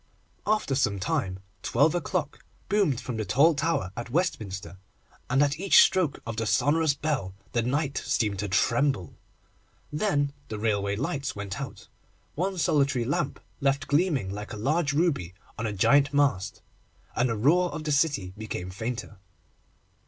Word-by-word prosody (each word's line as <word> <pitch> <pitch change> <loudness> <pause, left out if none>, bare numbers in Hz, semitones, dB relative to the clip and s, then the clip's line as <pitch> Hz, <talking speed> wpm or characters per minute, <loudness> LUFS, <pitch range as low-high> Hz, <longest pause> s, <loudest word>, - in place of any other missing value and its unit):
After 215 -9 +1
some 110 -7 +1
time, 95 0 -2 0.2
twelve 150 +2 +3
o'clock 155 -2 -2 0.3
boomed 190 - +2
from 125 -2 -5
the 110 - -1
tall 140 - +4
tower 140 - -1
at 120 0 -6
Westminster, 100 - -2 0.5
and 135 +3 +4
at 145 +2 0
each 195 +1 +6
stroke 175 -7 +1
of 115 -1 -5
the 115 -1 -1
sonorous 145 +5 +2
bell 140 -13 -2 0.2
the 120 - +1
night 135 +4 -1
seemed 105 -4 0
to 105 - -1
tremble. 120 - +1 0.8
Then 145 -5 +1
the 110 - -5
railway 100 -2 0
lights 140 +4 -3
went 100 +6 -5
out, 110 -7 -8 0.5
one 185 +4 -2
solitary 140 -6 +2
lamp 140 +2 -1 0.2
left 140 +1 +1
gleaming 145 - +1
like 105 +2 -6
a - - -5
large 145 +7 +1
ruby 140 - 0 0.2
on 115 - -3
a - - -2
giant 140 +8 +4
mast, 140 -10 +1 0.5
and 120 +2 +2
the 115 - -1
roar 170 +10 +3
of 155 - -5
the 155 - -2
city 140 - +1
became 105 -4 -5
fainter. 110 +1 -5
135 Hz, 155 wpm, -27 LUFS, 105-150 Hz, 0.8 s, each